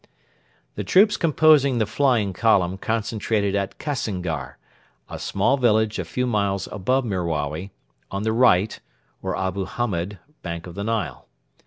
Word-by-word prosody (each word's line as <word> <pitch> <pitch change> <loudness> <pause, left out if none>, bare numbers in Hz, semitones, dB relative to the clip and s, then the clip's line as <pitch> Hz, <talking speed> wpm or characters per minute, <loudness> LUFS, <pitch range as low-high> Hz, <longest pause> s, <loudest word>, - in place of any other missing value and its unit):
The - - -4
troops 205 +3 +5
composing 150 -4 +4
the 110 - +2
'flying 110 -3 +1
column' 95 -3 +2
concentrated 110 -2 -1
at 100 -1 -2
Kassingar, 90 - -3 0.5
a - - -7
small 125 +8 +1
village 110 -4 +2
a 90 - -2
few 125 +10 -2
miles 100 -5 0
above 125 +7 0
Merawi, 85 -3 -2 0.4
on 100 +1 -3
the 110 0 0
right 110 -4 +3 0.4
(or - - -2
Abu 95 0 -2
Hamed) 100 -3 -3 0.2
bank 85 -1 -5
of 90 - -9
the 100 - -5
Nile. 110 -6 -3
105 Hz, 140 wpm, -23 LUFS, 95-120 Hz, 0.5 s, troops